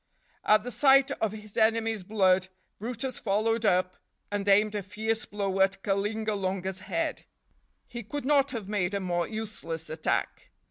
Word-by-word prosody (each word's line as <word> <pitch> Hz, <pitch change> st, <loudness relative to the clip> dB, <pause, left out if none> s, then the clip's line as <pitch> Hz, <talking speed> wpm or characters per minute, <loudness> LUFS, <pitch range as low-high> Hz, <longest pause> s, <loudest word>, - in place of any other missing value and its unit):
At 215 Hz, 0 st, +4 dB
the 245 Hz, -, -5 dB
sight 270 Hz, 0 st, +5 dB
of 220 Hz, -2 st, -1 dB
his 215 Hz, -1 st, -10 dB
enemy's 225 Hz, -1 st, +2 dB
blood, 185 Hz, -2 st, +2 dB, 0.3 s
brutus 245 Hz, +4 st, -4 dB
followed 220 Hz, +2 st, +1 dB
up 185 Hz, 0 st, +2 dB, 0.3 s
and 205 Hz, -1 st, -2 dB
aimed 205 Hz, +2 st, +4 dB
a 205 Hz, -, -2 dB
fierce 220 Hz, +3 st, -2 dB
blow 195 Hz, -2 st, -2 dB
at 195 Hz, 0 st, +2 dB
Kalingalunga's 195 Hz, -2 st, -1 dB
head; 320 Hz, -, -3 dB, 0.6 s
he 240 Hz, -1 st, -6 dB
could 280 Hz, +6 st, -5 dB
not 280 Hz, -1 st, +3 dB
have 230 Hz, -7 st, -5 dB
made 200 Hz, -2 st, -1 dB
a -, -, 0 dB
more 175 Hz, -2 st, -1 dB
useless 205 Hz, -8 st, -5 dB
attack. 155 Hz, 0 st, -2 dB
210 Hz, 150 wpm, -28 LUFS, 190-225 Hz, 0.6 s, sight